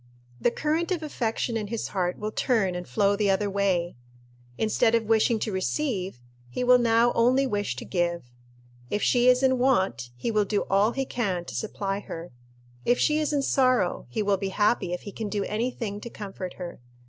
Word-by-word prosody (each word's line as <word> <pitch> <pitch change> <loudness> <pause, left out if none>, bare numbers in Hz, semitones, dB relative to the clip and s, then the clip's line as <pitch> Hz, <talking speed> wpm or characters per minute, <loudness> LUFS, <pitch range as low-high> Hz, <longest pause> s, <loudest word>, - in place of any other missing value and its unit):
The - - +3
current 315 +7 -1
of 350 -4 -1
affection 235 -5 -2
in 215 -2 -2
his 230 +1 -3
heart 180 -2 -1
will 215 +1 -4
turn 215 -6 +1
and 180 0 -5
flow 205 -1 +2
the 205 -1 +1
other 200 +1 +1
way. 185 -6 0 0.6
Instead 225 +1 +2
of 230 - +2
wishing 225 +1 +3
to 215 0 -3
receive, 190 - -2 0.3
he 120 - -3
will 250 0 +6
now 235 0 +3
only 255 +4 +3
wish 205 -5 -1
to - - -7
give. 175 -2 -1 0.7
If 205 - -1
she 245 0 +3
is 250 +1 +5
in 260 -1 +3
want, 190 - +1
he 125 - -2
will 215 -1 +3
do 205 0 0
all 205 +4 +3
he 270 0 -1
can 195 -9 -2
to - - -8
supply 200 -2 -3
her. 170 -4 -8 0.5
If 245 +1 +3
she 300 0 +2
is 305 -1 0
in 285 -2 +1
sorrow, 255 - +2
he 210 - -1
will 200 -1 +2
be 195 0 -3
happy 205 -2 +1
if 180 - -3
he 205 - -8
can 215 +1 -5
do 205 -1 -1
any 225 +4 -1
thing 210 -4 -5
to 235 - -7
comfort 195 -4 -7
her. 175 -2 -7
215 Hz, 205 wpm, -26 LUFS, 195-245 Hz, 0.7 s, will